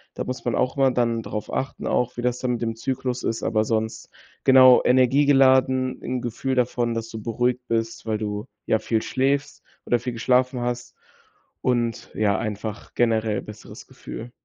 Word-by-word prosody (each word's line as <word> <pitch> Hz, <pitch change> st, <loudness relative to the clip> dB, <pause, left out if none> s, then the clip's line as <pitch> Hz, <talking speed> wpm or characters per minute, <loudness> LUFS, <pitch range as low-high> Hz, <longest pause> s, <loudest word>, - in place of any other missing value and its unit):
Da -, -, -3 dB
muss 130 Hz, 0 st, -5 dB
man 120 Hz, -, 0 dB
auch 130 Hz, +2 st, 0 dB
mal 135 Hz, -1 st, +4 dB
dann 115 Hz, -2 st, 0 dB
drauf 105 Hz, -, -5 dB
achten 135 Hz, -, -3 dB
auch, 125 Hz, 0 st, 0 dB
wie -, -, -2 dB
das 125 Hz, 0 st, 0 dB
dann 125 Hz, -1 st, -1 dB
mit 120 Hz, -, -4 dB
dem 115 Hz, -1 st, -2 dB
Zyklus 125 Hz, +1 st, -3 dB
ist, 115 Hz, -, -2 dB
aber 110 Hz, -1 st, +1 dB
sonst 110 Hz, 0 st, -2 dB, 0.4 s
genau, 130 Hz, -1 st, +8 dB
energiegeladen, 130 Hz, 0 st, +4 dB
'n 125 Hz, -1 st, -3 dB
Gefühl 125 Hz, +3 st, -2 dB
davon, 120 Hz, -1 st, 0 dB
dass 115 Hz, 0 st, -4 dB
du 110 Hz, -1 st, -7 dB
beruhigt 125 Hz, +2 st, 0 dB
bist, 115 Hz, 0 st, -2 dB
weil 110 Hz, -1 st, 0 dB
du, 105 Hz, +1 st, -4 dB, 0.2 s
ja, 110 Hz, -, +2 dB
viel 110 Hz, -1 st, -1 dB
schläfst 140 Hz, +2 st, -1 dB, 0.2 s
oder 120 Hz, -, +2 dB
viel 125 Hz, 0 st, -4 dB
geschlafen 125 Hz, +1 st, +1 dB
hast 125 Hz, 0 st, -4 dB, 0.7 s
und, 120 Hz, -2 st, -1 dB
ja, 100 Hz, -3 st, +2 dB
einfach 105 Hz, 0 st, -5 dB
generell 110 Hz, -3 st, +1 dB
besseres 105 Hz, 0 st, -11 dB
Gefühl. 120 Hz, +2 st, -9 dB
120 Hz, 175 wpm, -23 LUFS, 115-130 Hz, 0.7 s, genau